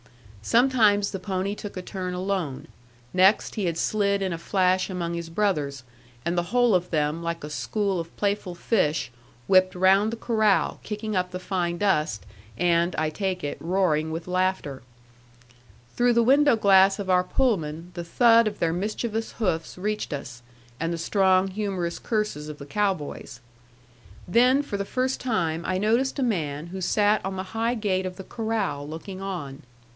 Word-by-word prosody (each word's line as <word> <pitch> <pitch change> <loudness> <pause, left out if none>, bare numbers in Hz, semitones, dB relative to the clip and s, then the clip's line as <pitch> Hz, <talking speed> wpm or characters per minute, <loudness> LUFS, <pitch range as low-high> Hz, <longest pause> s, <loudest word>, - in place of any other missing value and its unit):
Sometimes 220 - +3
the 195 - -4
pony 190 +1 -2
took 205 -2 -8
a 185 - -5
turn 185 -1 -4
alone; 180 -7 -3 0.5
next 190 +3 +4
he 210 -4 -2
had 170 -2 -1
slid 200 +1 +1
in 185 -2 -1
a 165 - -5
flash 185 +1 +1
among 175 -2 -3
his 170 -1 -5
brothers, 150 -8 -1 0.4
and 170 - 0
the 175 0 0
whole 245 -1 +3
of 180 -1 +1
them 150 0 0
like 170 -1 -4
a 150 - -5
school 200 +3 -1
of 165 0 -8
playful 200 -3 -1
fish 160 - 0 0.3
whipped 185 +2 +4
round 190 +3 +4
the 230 - -5
corral, 220 -3 +1
kicking 215 0 -4
up 180 0 0
the 180 0 -6
fine 175 -2 -2
dust, 150 - 0 0.3
and 170 +3 +2
(I 155 0 0
take 185 +1 -3
it) 145 - -4
roaring 165 -3 +1
with 165 +2 -5
laughter. 185 -7 -1 1.1
Through 245 0 +3
the 235 0 +4
window 280 +2 +5
glass 195 -2 +5
of 200 -2 -5
our 180 -1 +3
Pullman 175 - -1
the 175 - -5
thud 230 +6 +5
of 205 -1 -3
their 165 -1 0
mischievous 220 +4 -3
hoofs 175 -8 -2
reached 210 +2 -3
us, 135 -4 -6 0.4
and 165 +1 -1
the 170 - -2
strong, 190 +2 +2
humorous 190 -4 -3
curses 210 -10 -2
of 150 - -7
the 140 - -9
cow 200 +6 +1
boys. 145 -5 -8 0.9
Then 250 +9 +4
for 205 -8 -4
the 200 - -3
first 255 +4 -1
time 170 -9 -1
I 185 - 0
noticed 230 +8 +1
a 275 - 0
man 160 - -2
who 190 +2 -7
sat 210 +3 +2
on 190 0 -3
the 185 - -3
high 230 +2 0
gate 190 -4 -1
of 185 - -7
the 190 - -8
corral, 220 -11 -3
looking 185 +4 -7
on. 165 -8 -5
185 Hz, 175 wpm, -25 LUFS, 170-210 Hz, 1.1 s, window